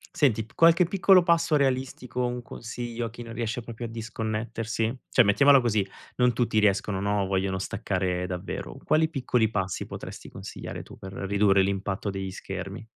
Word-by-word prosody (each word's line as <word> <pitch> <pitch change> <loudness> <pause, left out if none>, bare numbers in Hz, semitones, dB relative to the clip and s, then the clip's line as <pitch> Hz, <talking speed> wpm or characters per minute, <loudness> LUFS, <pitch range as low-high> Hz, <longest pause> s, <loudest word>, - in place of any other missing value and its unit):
Senti, 125 - +2
p 120 - -23
qualche 165 +3 +5
piccolo 190 0 +5
passo 170 -2 +3
realistico 130 -2 -1
o 125 - +2
un 125 0 -3
consiglio 120 0 -5
a - - -4
chi 120 +1 -9
non 115 - -9
riesce 115 +2 -2
proprio 115 +1 -7
a - - -3
disconnettersi? 115 0 -3
Cioè, 125 - +5
mettiamola 140 +7 +6
così: 105 -5 +1 0.3
non 125 -1 +4
tutti 115 -2 +1
riescono, 100 -1 +2
no, 100 +1 +1
o - - 0
vogliono 95 0 0
staccare 95 -2 -2
davvero; 90 0 -5
quali 160 0 +3
piccoli 125 -7 +1
passi 95 -4 -2
potresti - - -8
consigliare - - -7
tu - - -13
per 95 0 -9
ridurre 100 0 +3
l'impatto 100 +1 -2
degli 95 -1 -4
schermi? 95 +3 -6
115 Hz, 175 wpm, -27 LUFS, 100-125 Hz, 0.3 s, mettiamola